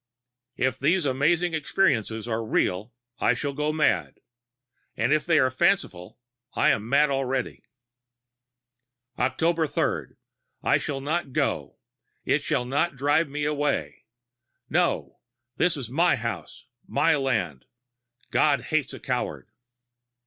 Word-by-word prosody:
If 130 0 0
these 165 +4 +2
amazing 160 +6 +1
experiences 120 - 0
are 115 -1 -1
real 110 0 0 0.3
I 120 - +3
shall 140 +3 -3
go 150 +2 -1
mad; 155 0 +1 0.8
if 145 +9 +1
they 165 -2 +4
are 130 -3 +3
fanciful 130 - 0 0.4
I - - +4
am 110 +2 -2
mad 140 +2 +4
already. 135 -1 -2 1.6
"Oct. 160 +4 +1
3. - - -1 0.5
I - - +3
shall 135 -2 -4
not 150 -1 -2
go - - -1 0.5
it - - +2
shall 125 - -1
not 145 +5 0
drive 145 +4 +2
me 145 +1 -3
away. 145 -1 -1 0.7
No, - - 0 0.4
this 175 -3 +2
is 125 -4 -6
my 170 +4 +3
house, 115 -2 -6 0.2
my 165 -1 +3
land. 110 - -1 0.7
God 145 -2 +3
hates 155 -4 -1
a - - -10
coward.... 125 -3 -3
140 Hz, 120 wpm, -26 LUFS, 125-155 Hz, 1.6 s, they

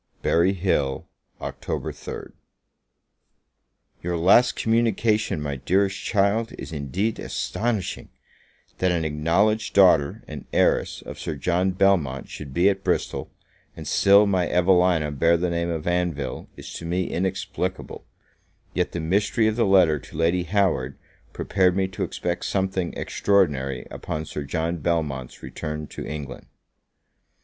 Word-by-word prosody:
Berry 85 +4 +3
Hill, 85 -8 -1 0.3
Oct. - - -6
3rd. - - -5 1.7
YOUR 85 0 -2
last 95 +9 +5
communication, 110 -4 +1
my 70 -2 -3
dearest 95 +7 +1
child, 105 +3 +1
is - - -8
indeed 85 - -2
astonishing; 110 -5 -3 0.7
that 95 -1 +2
an 85 -2 0
acknowledged 85 +9 +1
daughter 90 -7 +4
and - - -8
heiress - - +1
of - - -9
Sir 80 - -4
John 90 +6 +1
Belmont 90 -8 +1
should 70 -3 -8
be 85 +8 +3
at 95 -1 +1
Bristol, - - -1 0.5
and - - -7
still 100 +1 +5
my 95 -3 +1
Evelina 90 -3 +3
bear 85 +4 +3
the 90 +1 -1
name 85 0 -1
of 80 -2 -3
Anville, 85 -7 -2
is - - -9
to 85 - -7
me 90 +2 -1
inexplicable; 95 +2 -3 0.7
yet - - -1
the 85 - -2
mystery 100 +7 +1
of 110 0 +2
the 115 -2 +2
letter 90 -6 +5
to 75 - -12
Lady 85 +2 +1
Howard 85 -9 0 0.3
prepared 95 -2 +1
me 95 -1 +1
to 95 - -8
expect 85 0 -3
something 95 -2 -1
extraordinary 70 -10 +1
upon 80 0 -4
Sir 75 -1 -5
John 80 +4 -2
Belmont's 75 -6 -2
return 75 0 -5
to - - -7
England. 75 -2 -7
90 Hz, 135 wpm, -24 LUFS, 75-95 Hz, 1.7 s, last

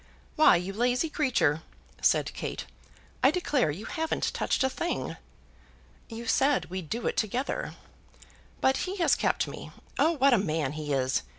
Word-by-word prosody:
"Why, 310 - +7
you 180 +3 -2
lazy 250 +8 +1
creature," 170 - +1 0.4
said - - +2
Kate; - - -5 0.6
"I 265 - +6
declare 295 - +1
you 180 +9 -5
haven't 320 0 -2
touched - - 0
a - - +4
thing." 345 +5 -3 0.9
"You 230 0 -7
said 270 -1 +2
we'd 185 -4 -5
do 235 +2 -3
it - - 0
together." 240 +5 -2 0.9
"But 265 0 +3
he 375 +1 -3
has 340 - +3
kept - - 0
me. - - -8 0.3
Oh, 330 - +4
what 275 -3 +4
a 235 - +5
man 155 -7 -1
he 150 -1 -5
is! 130 - +1
240 Hz, 160 wpm, -28 LUFS, -, 0.9 s, Why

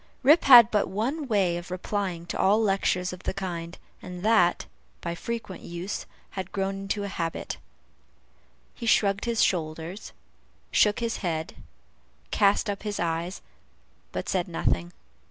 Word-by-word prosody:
Rip 300 +6 +6
had 240 -5 +10
but 210 -2 +2
one 265 +9 -2
way 195 -6 +2
of 175 +1 -8
replying 185 -1 -3
to - - -5
all 205 +3 +4
lectures 195 -3 +1
of 180 - -9
the - - -3
kind, 175 -3 -5 0.2
and 180 0 -8
that, 215 -6 +3 0.3
by 170 - -4
frequent 210 +1 -5
use, 175 +3 -5 0.2
had 190 -2 -5
grown 195 0 -1
into 195 +1 -2
a - - -3
habit. 165 -4 -4 1.2
He 235 - -6
shrugged 200 -1 +3
his 235 -1 +2
shoulders, 165 +2 -2 0.6
shook 210 +3 +3
his 230 -1 -1
head, 160 -4 -3 0.8
cast 205 0 +3
up 200 -1 -3
his 210 -1 -4
eyes, 170 +2 -2 0.7
but - - -4
said - - 0
nothing. 85 0 -1
195 Hz, 145 wpm, -27 LUFS, 175-210 Hz, 1.2 s, had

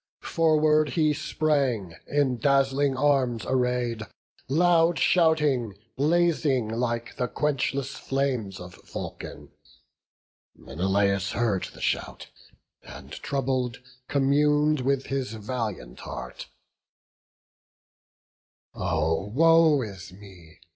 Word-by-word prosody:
Forward 155 -2 +3
he 155 -1 +2
sprang, 140 - 0
in 140 -4 +1
dazzling 135 +1 +2
arms 130 -5 +1
array'd, 125 -3 0 0.5
Loud 165 +2 +3
shouting, 150 - +2 0.2
blazing 150 -5 +2
like 115 0 -3
the 125 - 0
quenchless 140 -1 -1
flames 130 -8 -2
Of 90 0 -10 0.2
Vulcan: - - -7 1.0
Menelaus 100 +2 0
heard 105 -4 0
the - - -12
shout, - - -3 0.5
And, - - -12
troubled, 130 -3 -2 0.3
commun'd 150 +2 +2
with 135 +1 0
his 135 -5 -3
valiant 105 - -5
heart: 60 0 -8 2.3
"Oh, 80 +1 -1
woe 160 +3 +4
is 100 -3 -9
me! 90 -4 -15
130 Hz, 90 wpm, -26 LUFS, 105-150 Hz, 2.3 s, woe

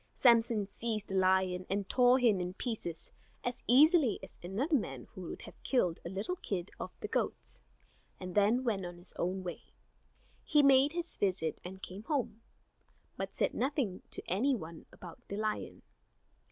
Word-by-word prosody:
Samson 230 -4 +4
seized 215 +1 -4
the - - -4
lion, 185 -1 +2
and 195 0 -1
tore 250 0 +5
him 225 -7 +3
in 180 +1 -4
pieces 200 -10 -4 0.3
as 245 0 -3
easily 290 - +6
as 190 - -11
another 215 - -2
man 135 - -2
would 180 -3 -7
have - - -13
killed 180 -11 +1
a - - -5
little 200 - -3
kid 185 - -4
of - - -4
the - - -3
goats, - - -3 0.6
and 185 -1 -6
then 210 +6 +3
went 215 -6 0
on 175 -1 -6
his 175 +1 -10
way. 180 0 -3 0.8
He 295 -2 +4
made 275 +2 +6
his 345 0 -3
visit 185 -5 0
and 190 +1 -9
came 185 +3 -7
home, 235 -6 -1 0.7
but - - -5
said - - +1
nothing 260 -8 -1
to - - -5
any 255 +10 +2
one 165 -6 -8
about 175 -3 -11
the 200 - -4
lion. 215 0 -3
205 Hz, 165 wpm, -33 LUFS, 185-250 Hz, 0.8 s, easily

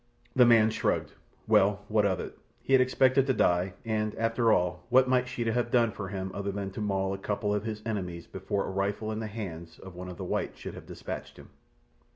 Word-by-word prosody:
The 125 -2 +7
man 115 -2 +6
shrugged. - - -1 0.3
Well, 100 +1 +3
what 105 -1 +3
of 95 -2 0
it? - - -6 0.3
He 135 - 0
had 130 - +7
expected 130 +1 +3
to 130 - +2
die, 90 +1 +2
and, 110 -1 -1
after 115 0 +2
all, 90 -2 +1
what 130 +1 +5
might 125 0 +2
Sheeta 120 -3 -2
have 120 0 0
done 120 -2 +3
for 100 -2 -6
him 95 -1 -4
other 100 0 -3
than 100 -1 -4
to 105 - -6
maul 95 -2 0
a 95 - -5
couple 105 +1 -1
of 105 +1 -1
his 110 -1 -4
enemies 90 -6 -3
before 95 +1 -3
a - - -4
rifle 100 +3 -1
in 110 - -3
the 110 - -3
hands 85 -6 -7
of 95 -1 -11
one 90 +1 -7
of 90 - -8
the - - -5
whites - - -2
should - - -7
have - - -11
dispatched - - -7
him! - - -13
105 Hz, 225 wpm, -29 LUFS, 95-115 Hz, 0.3 s, The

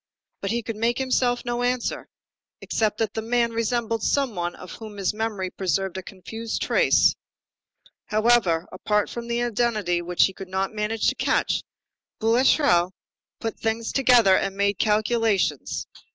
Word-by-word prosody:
But 195 - -2
he 235 +2 -1
could 225 -1 -5
make 235 +2 +1
himself 255 -2 0
no 240 0 -2
answer, 245 0 -1 0.5
except 215 -2 -1
that 220 -2 -1
the 220 - -2
man 235 +1 +1
resembled 230 0 -1
some 275 -2 +1
one 175 -2 -3
of 180 - -11
whom 215 -2 -9
his 195 0 0
memory 210 -4 -3
preserved 190 0 -1
a 190 - -4
confused 225 +5 -5
trace. - - +4 0.9
However, 215 -6 +2
apart 210 +3 0
from 235 0 -6
the 235 0 0
identity 215 -7 0
which 175 0 +2
he 190 - -3
could 190 0 -9
not 190 +2 -2
manage 215 +1 -1
to - - -1
catch, - - +1 0.6
Boulatruelle 225 - +3 0.5
put 225 -1 -4
things 225 0 -1
together 245 -7 +5
and 195 +1 -1
made 200 -1 +1
calculations. 215 - +1
220 Hz, 150 wpm, -24 LUFS, 195-235 Hz, 0.9 s, together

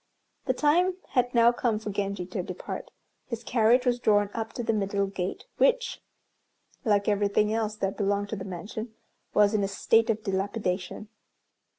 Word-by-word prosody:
The 255 - +1
time 350 +7 +3
had 245 -2 +1
now 235 0 +6
come 240 -2 0
for 215 -1 -5
Genji 200 -2 -2
to 185 +1 -4
depart. 180 0 -6 0.4
His 235 -1 -5
carriage 235 +2 +3
was 245 -1 +2
drawn 205 -3 +3
up 225 -1 -3
to 240 - -4
the 225 0 +1
middle 200 -1 0
gate, 190 -1 -4
which, - - +2 0.8
like 205 -3 +2
everything 210 +1 +2
else 220 -1 -1
that 195 -2 -2
belonged 205 0 0
to 220 - -2
the 190 - -6
mansion, 210 +5 -6 0.4
was 210 0 +5
in 210 -2 +2
a - - +1
state 225 +3 +2
of 220 -1 0
dilapidation. 195 0 -2
210 Hz, 170 wpm, -27 LUFS, 200-230 Hz, 0.8 s, now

